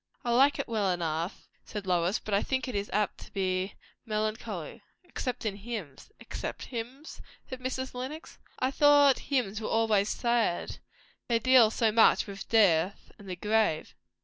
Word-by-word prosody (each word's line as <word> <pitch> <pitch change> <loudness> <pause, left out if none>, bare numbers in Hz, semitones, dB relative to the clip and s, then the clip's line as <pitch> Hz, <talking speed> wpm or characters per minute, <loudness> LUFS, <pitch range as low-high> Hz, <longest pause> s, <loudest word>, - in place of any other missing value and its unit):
"I 240 - +1
like 270 +4 +4
it 280 - -3
well 215 -4 0
enough," 170 0 -2 0.2
said 210 -2 -7
Lois, 180 +1 +1
"but 215 - -6
I 200 - +3
think 260 -2 -2
it 255 - -4
is 200 0 -2
apt 210 -1 0
to - - -12
be 185 -1 -1 0.3
melancholy. 215 -6 -4 0.2
Except 255 -9 -5
in 200 -2 -2
hymns." 205 - -7
"Except - - -6
hymns!" 255 +5 -7 0.3
said 260 - -7
Mrs. 260 +1 -4
Lenox. 265 +6 -7 0.2
"I 255 +1 0
thought 290 -1 +5
hymns 225 -6 0
were 215 - -3
always 215 -2 +2
sad. 235 -7 0 0.5
They 235 - +3
deal 245 -1 +6
so 225 0 +1
much 225 +1 +5
with 200 -1 -8
death 195 -4 +3
and 200 -2 -11
the 180 - -3
grave." 210 -4 0
220 Hz, 165 wpm, -29 LUFS, 195-250 Hz, 0.5 s, deal